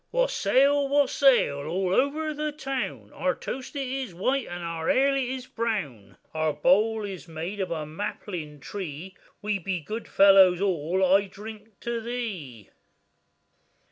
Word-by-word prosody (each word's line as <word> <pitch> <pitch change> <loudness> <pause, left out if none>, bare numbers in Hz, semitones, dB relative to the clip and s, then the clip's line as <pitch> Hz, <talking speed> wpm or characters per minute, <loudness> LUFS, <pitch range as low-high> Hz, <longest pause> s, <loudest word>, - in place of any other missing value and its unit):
] - - -48
WASSAIL! 285 - +3
wassail! 275 - +4
all 185 +2 0
over 305 +6 +1
the 300 0 -2
town, 260 - -4
Our 180 - 0
toast 260 +2 -6
it 275 -2 -2
is 260 -7 -4
white, 255 +8 0
and 175 0 -6
our 165 -1 -3
ale 275 +1 +4
it 265 -2 0
is 260 -1 -4
brown; 210 - -4 0.2
Our 155 -1 0
bowl 210 +8 +3
is 190 -4 -7
made 165 +5 -5
of 190 -2 -1
a 160 -2 -3
maplin 155 -2 -6
tree; 185 +1 -7 0.3
We 210 -1 0
be 185 0 -2
good 215 +9 -6
fellows 195 -2 +6
all;—I 190 +2 +2
drink 215 +1 -11
to 235 -1 -3
thee. 200 - -5
200 Hz, 145 wpm, -26 LUFS, 170-255 Hz, 0.3 s, fellows